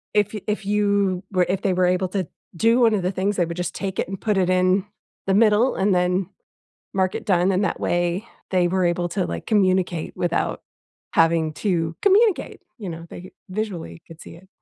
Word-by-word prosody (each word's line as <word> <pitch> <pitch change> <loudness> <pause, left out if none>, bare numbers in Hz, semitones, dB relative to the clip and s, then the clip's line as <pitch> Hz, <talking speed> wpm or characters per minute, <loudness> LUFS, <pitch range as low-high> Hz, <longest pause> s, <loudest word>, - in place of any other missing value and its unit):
if 210 0 +2
y 210 - -5
if 210 -1 -2
you 200 -2 +1
were 185 -2 +2
if 190 0 0
they 190 - +2
were 180 0 +2
able 185 +1 +1
to 185 -3 -2 0.3
do 230 +7 +3
one 230 -2 +5
of 195 - -2
the 185 - 0
things, 195 +2 -1
would 170 -1 0
just 180 - -3
take 195 -1 -4
it - - 0
and 195 - -5
put 210 -3 0
it 185 -1 +2
in 185 +1 +2 0.4
the 195 - +2
middle 220 +3 +4
and 195 +1 +2
then 180 +1 +1 0.7
mark 190 -1 +1
it - - -7
done, 185 -1 +3
and 190 +2 +1
that - - -1
way, 175 +4 0 0.2
they 180 -2 +3
were 185 +1 0
able 175 0 0
to, 190 -3 -1
like, - - -5
communicate 185 -5 +1
without 175 -1 -1 0.5
having 165 -1 +3
to 165 -2 -1
communicate, 410 0 +3 0.2
you 205 -4 -6
know, 165 0 -8
they 180 +1 -10 0.2
visually 185 -5 -5
could 165 -2 -12
see 165 - -11
it. 190 +2 -18
185 Hz, 205 wpm, -22 LUFS, 175-205 Hz, 0.7 s, one